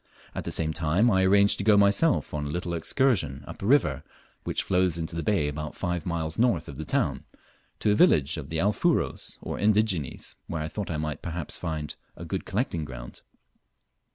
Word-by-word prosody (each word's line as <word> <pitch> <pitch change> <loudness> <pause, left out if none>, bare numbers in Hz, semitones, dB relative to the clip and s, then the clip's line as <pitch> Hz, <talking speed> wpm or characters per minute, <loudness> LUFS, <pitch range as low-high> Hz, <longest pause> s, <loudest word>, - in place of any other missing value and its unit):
At - - -5
the - - -3
same 80 -1 +1
time 85 +9 +2
I 95 -1 +3
arranged 100 +1 +4
to - - -1
go 105 0 +5
myself 100 +11 +3
on 75 -1 -2
a - - -5
little 85 +2 -3
excursion 85 - +1
up - - -10
a 100 - -2
river 140 +4 +3 0.4
which - - -1
flows 90 -2 +1
into 80 0 -4
the 85 - -2
bay 95 -6 +1
about 75 +1 -5
five 90 -3 -3
miles 80 0 -3
north 115 -10 +2
of 70 - -8
the 80 - -5
town, - - 0 0.6
to 105 - +3
a - - +3
village 80 - +4
of 75 -3 -7
the 80 - -2
Alfuros, 105 +4 0
or - - -4
indigenes, 105 - +1
where 80 -2 -3
I 80 - -4
thought 105 +4 -5
I 80 - -2
might 75 -1 -3
perhaps 85 -3 -3
find 80 -3 -4 0.2
a 85 - -7
good 95 +3 -4
collecting 95 - -1
ground. 65 -4 -9
85 Hz, 200 wpm, -27 LUFS, 75-100 Hz, 0.6 s, go